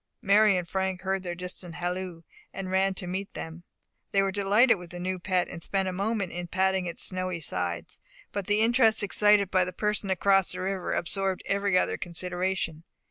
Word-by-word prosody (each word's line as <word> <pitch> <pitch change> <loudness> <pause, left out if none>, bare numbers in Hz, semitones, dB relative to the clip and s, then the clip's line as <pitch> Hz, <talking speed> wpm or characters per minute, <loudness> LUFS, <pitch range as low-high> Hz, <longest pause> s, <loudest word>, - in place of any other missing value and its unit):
Mary 200 0 +5
and 175 -1 -3
Frank 190 +1 -2
heard 190 0 -1
their 175 -2 -4
distant 180 -1 -5
halloo, 180 -1 -4 0.3
and 185 -1 -5
ran 190 0 +2
to 185 - -4
meet 190 +2 -4
them. 165 +1 -7 0.5
They 195 0 +3
were 195 - 0
delighted 205 +3 +4
with 175 -1 -10
the 175 0 -8
new 185 +1 -2
pet, 180 -1 0
and 170 - -8
spent 195 +2 -1
a 185 - -2
moment 200 0 -1
in 175 0 -5
patting 190 0 +1
its 170 - -2
snowy 185 -2 -2
sides; 90 - -3 0.3
but 200 -2 -4
the 205 +1 +2
interest 225 -2 +4
excited 205 -1 +4
by 185 -1 +4
the 180 - -4
person 210 +1 -1
across 195 0 +3
the - - -5
river 190 -1 -2
absorbed 190 +2 0
every 200 -1 +1
other - - +1
consideration. 175 -1 -2
190 Hz, 190 wpm, -28 LUFS, 180-195 Hz, 0.5 s, Mary